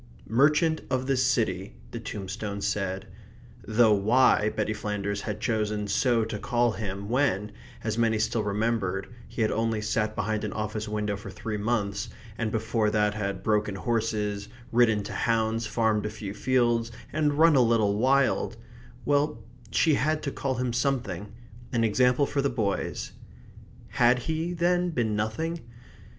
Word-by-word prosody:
"Merchant 150 +7 +3
of 130 -1 0
this 130 -1 +2
city," 110 -7 0 0.2
the 115 - -5
tombstone 100 -1 -5
said; 95 -2 -2 0.6
though 110 0 +5
why 110 +1 +4
Betty 110 0 -1
Flanders 100 -1 -3
had 105 0 -4
chosen 105 -2 -1
so 115 +1 +2
to 110 -2 -5
call 120 +1 +1
him 100 -2 -5
when, 110 -5 +1 0.3
as 110 0 -1
many 115 -1 +3
still 110 +1 0
remembered, 105 -2 -1 0.2
he 115 - -2
had 110 - +1
only 115 -1 0
sat 110 0 -1
behind 110 +1 -1
an 105 - -3
office 105 0 -3
window 105 -1 -1
for 100 - -8
three 110 -3 -5
months, 100 -2 -1 0.3
and 115 -2 -2
before 110 0 0
that 105 -1 +2
had 100 -2 -3
broken 105 -2 +1
horses, 105 -2 -1 0.2
ridden 115 -3 +3
to - - -6
hounds, 115 0 0
farmed 110 -1 +1
a - - -3
few 105 -2 -6
fields, 120 0 +1 0.2
and 150 -1 +1
run 160 -1 +6
a 130 - +6
little 115 -4 +3
wild 130 +4 +2 0.5
well, 145 +1 +1 0.3
she 155 +7 +3
had 155 +3 +1
to 140 - -2
call 135 -1 -2
him 125 -1 -1
something. 115 -7 -1 0.4
An 115 -2 +1
example 125 +5 +3
for 140 0 -1
the 140 - +1
boys. 110 -6 -2 0.8
Had 120 +1 +4
he, 160 +6 -2
then, 175 +1 +2
been 115 -9 0
nothing? 160 +11 -2
110 Hz, 155 wpm, -27 LUFS, 105-125 Hz, 0.8 s, run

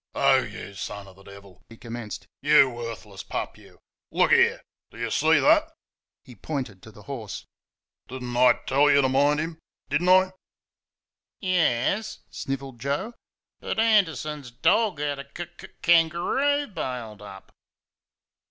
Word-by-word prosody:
"Oh, - - +4
YOU 100 - -8
son 100 +1 -6
of 95 - -15
the 95 - -18
Devil!" 100 -1 -14
he 115 - -13
commenced. 115 -3 -7 0.2
"YOU 145 -2 +5
worthless 115 -4 -7
pup, - - -4
you! - - -18 0.3
Look - - +2
there! - - +4 0.3
Do - - -16
you 115 -1 -3
see 160 +2 +4
that?" 315 +1 +4 0.6
(He 130 - -13
pointed 120 -5 -5
to 110 - -13
the 105 0 -15
horse.) 115 -3 -7 0.6
"Did 130 0 -7
n't 120 -1 -5
I 125 0 +6
tell 140 +2 +4
you 140 -1 +5
to - - +4
mind 145 +3 +3
him? 160 +1 -4 0.3
Did 145 +3 +1
n' 185 +1 +5 0.5
" - - -68
"Yes," 185 - +1
snivelled 135 -2 -5
Joe; 145 - -2 0.5
"but - - -4
Anderson's 160 - +1
dog 175 - +2
had 145 -1 -2
a - - -5
k 165 +5 -7
k - - -11 0.2
k 175 - +6
angaroo 180 - +2
bailed 120 - -5
up." 100 -2 -12
140 Hz, 155 wpm, -25 LUFS, 115-165 Hz, 0.6 s, I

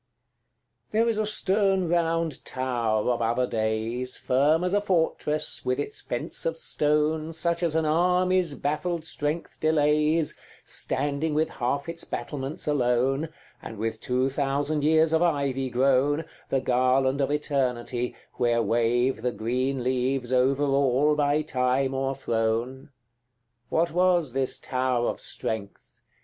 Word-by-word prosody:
XCIX. - - -42
There 225 +2 +3
is 225 - 0
a 215 - 0
stern 195 -3 +1
round 165 -2 0
tower 120 -3 -1
of 120 - -1
other 120 +2 +1
days, 115 +2 -2
Firm 145 +6 +2
as 180 +1 0
a 205 - +3
fortress, 165 -5 0
with 125 0 -1
its 430 - -3
fence - - -2
of - - -2
stone, 155 - 0
Such 170 +1 +1
as 165 -3 0
an 160 -1 +2
army's 180 0 +2
baffled 155 +3 -2
strength 155 +1 -4
delays, 150 0 +2 0.3
Standing 145 +2 0
with 155 +1 +1
half 140 +4 -2
its 165 0 -6
battlements 140 0 -5
alone, 135 +2 +1 0.3
And 110 - -8
with 110 +1 -3
two 130 +2 0
thousand 145 +2 -1
years 160 +1 +3
of 160 - +3
ivy 140 -6 0
grown, 135 +4 +2 0.2
The 135 - +1
garland 130 +2 +2
of 135 - +1
eternity, 130 -4 -1 0.2
where 120 -1 +2
wave 120 +1 +1
The 125 +1 0
green 125 +3 -2
leaves 130 0 -1
over 130 +3 +2
all 140 +1 +2
by 145 +1 +1
time 130 -2 0
o'erthrown: 130 -1 -2 0.8
What 170 +1 +1
was 175 -6 +2
this 135 -1 +1
tower 125 -2 -1
of - - -5
strength? 105 -3 -5
140 Hz, 135 wpm, -26 LUFS, 125-160 Hz, 0.8 s, There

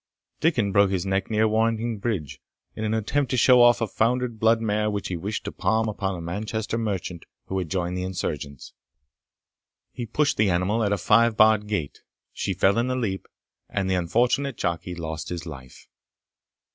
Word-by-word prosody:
Dickon 120 -11 +1
broke 100 0 +4
his 95 -1 -1
neck 95 0 -1
near 110 0 +2
Warrington 115 0 0
Bridge, 100 - -3 0.3
in 110 - -5
an 110 0 0
attempt 125 +5 0
to 130 - 0
show 125 +1 +6
off 120 0 +6
a 115 - +1
foundered 120 +2 0
blood 115 +1 +4
mare 105 -1 0
which 100 -1 -3
he 90 - -2
wished 100 +5 -4
to - - -3
palm 110 0 0
upon 100 -2 -2
a 85 - -6
Manchester 110 +6 -3
merchant 95 -6 -3 0.2
who 95 - -2
had 90 -4 -4
joined 90 0 -2
the 90 - -2
insurgents. 75 -7 -5 1.2
He 120 - -6
pushed 145 +6 +1
the 105 -1 +3
animal 95 +6 +1
at 100 - +1
a 100 - +2
five 110 +4 +3
barred 110 -1 +5
gate; 100 -9 -3 0.3
she 95 - -2
fell 95 +5 +3
in 120 - +1
the 130 - -1
leap, 105 -7 -3 0.4
and 100 -2 -1
the 95 - +1
unfortunate 120 +9 +1
jockey 85 0 -2
lost 80 -2 -5
his 85 -1 -5
life. 65 -6 -11
105 Hz, 185 wpm, -25 LUFS, 90-115 Hz, 1.2 s, show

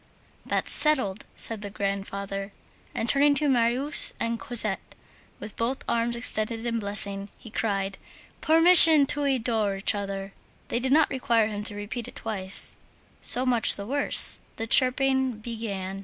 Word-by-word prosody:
"That's - - -2
settled," 255 -10 +3
said 225 -2 -4
the 205 - -7
grandfather. 200 0 -5 0.4
And, 225 - -3
turning 285 +2 +3
to 295 +2 +1
Marius 255 +3 +2
and 230 0 -3
Cosette, 240 -2 -2 0.4
with 210 - -9
both 245 +4 -4
arms 235 0 -1
extended 225 -1 +2
in 230 -1 -2
blessing, 200 -1 -2
he 225 - -14
cried: 195 -3 -3 0.4
"Permission 325 -2 +6
to 290 +1 -1
adore 225 -6 -1
each 195 +2 -1
other!" 195 -1 -6 0.4
They 235 - -1
did 260 +1 -2
not 310 +2 +3
require 235 -4 0
him 205 -1 -6
to 210 - -2
repeat 205 +3 -7
it - - -12
twice. 200 -4 0 0.4
So 250 +2 0
much 240 -3 +3
the 200 - -8
worse! 280 +5 +3 0.2
the 225 - -4
chirping 265 +1 +2
began. 215 -4 -7
230 Hz, 150 wpm, -25 LUFS, 200-260 Hz, 0.4 s, Permission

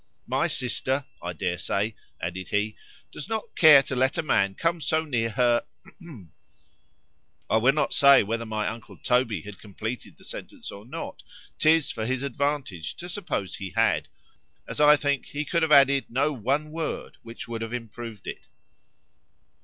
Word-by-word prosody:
—My - - +1
sister, 130 +2 -1 0.2
I 85 0 -4
dare 90 -2 -2
say, 105 +2 -1 0.2
added 90 +2 -4
he, 105 +1 -1 0.4
does 150 - -7
not 220 0 -4
care 150 -4 +8
to 130 - -4
let 130 +3 +2
a 165 - 0
man 100 -9 +2
come 165 - 0
so 160 +1 +1
near 115 -6 0
her. 120 +1 +2 1.8
I 110 - +3
will 125 +5 +4
not 150 - 0
say 140 -3 +7
whether 115 +3 -2
my 110 -1 -1
uncle 115 0 -7
Toby 120 -8 +1
had 105 -1 -10
completed 110 +4 -6
the - - -19
sentence - - -8
or 100 +3 -11
not;—'tis 155 +3 -1
for 110 0 -3
his 130 +1 -1
advantage 140 - -2
to 175 - -7
suppose 170 - -3
he 95 -4 -7
had,——as, - - -2
I 150 0 +8
think, 145 -2 -1
he 145 +1 -4
could 170 +3 0
have 160 -1 +1
added 140 -1 +6
no 145 +5 +1
ONE 140 +6 -1
WORD 160 0 -4
which 115 0 -9
would 115 -1 -5
have 115 0 -4
improved 115 -2 -8
it. - - -6
125 Hz, 160 wpm, -26 LUFS, 110-145 Hz, 1.8 s, care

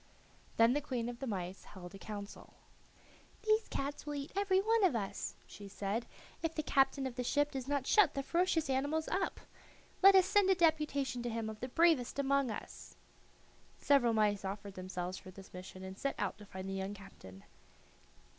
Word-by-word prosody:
Then 230 +2 +6
the 295 - 0
queen 250 -5 -3
of 240 -1 -7
the 270 - -4
mice 190 -3 -4
held 180 -2 -11
a 195 - -10
council. 205 -1 -8 0.9
"These 435 0 +2
cats 280 +1 -4
will 295 0 -4
eat 280 0 -5
every 395 -1 +3
one 445 +2 +2
of 360 -10 +4
us," 200 -4 -3
she 205 - -11
said, 200 +3 -3 0.3
"if 325 -1 -2
the 310 - -1
captain 270 -1 +2
of 260 - -3
the 250 - -1
ship 290 +4 +1
does 265 -2 -5
not 285 -2 0
shut 420 +1 +5
the 275 - -1
ferocious 340 -1 +1
animals 285 +4 0
up. 380 0 -1 0.6
Let 390 0 +9
us 375 -1 +7
send 405 0 +3
a 380 - +5
deputation 300 -7 +1
to 240 - -2
him 225 -1 -3
of 215 - -11
the 255 - -4
bravest 310 -3 +3
among 275 -1 +2
us." 215 - -8 0.8
Several 265 -5 +4
mice 210 -2 +2
offered 200 +1 -5
themselves 185 0 -5
for - - -12
this 190 +1 -13
mission 185 +1 -9
and 190 0 -7
set 275 +7 -2
out 200 0 -2
to 210 - -12
find 190 -1 -7
the 195 - -3
young 195 +1 -3
captain. 95 - -13
250 Hz, 195 wpm, -34 LUFS, 200-300 Hz, 0.9 s, Let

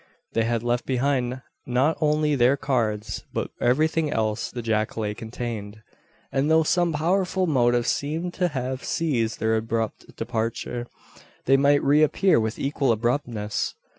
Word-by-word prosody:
They 115 - +2
had 115 0 -1
left 120 0 -1
behind 130 -1 0 0.2
not 130 +6 +2
only 150 0 +2
their 130 +1 +4
cards, 110 -7 -1
but - - -3
everything 155 +4 +2
else 110 0 -1
the 120 -1 -6
jacale 110 -1 -1
contained; 110 -2 -6 0.5
and 135 +3 +1
though 160 0 +5
some 175 +2 +2
powerful 185 +4 +1
motive 120 -6 +2
seemed 160 +8 -1
to 180 - +1
have 130 -4 -3
caused 125 -9 -1
their 110 0 +2
abrupt 110 0 -3
departure, 115 +1 -3 0.6
they 135 - +5
might 140 +1 +4
re 145 +2 +4
appear 175 +1 +4
with 110 0 -2
equal 140 -2 0
abruptness. 115 -2 -1
125 Hz, 140 wpm, -25 LUFS, 115-150 Hz, 0.6 s, though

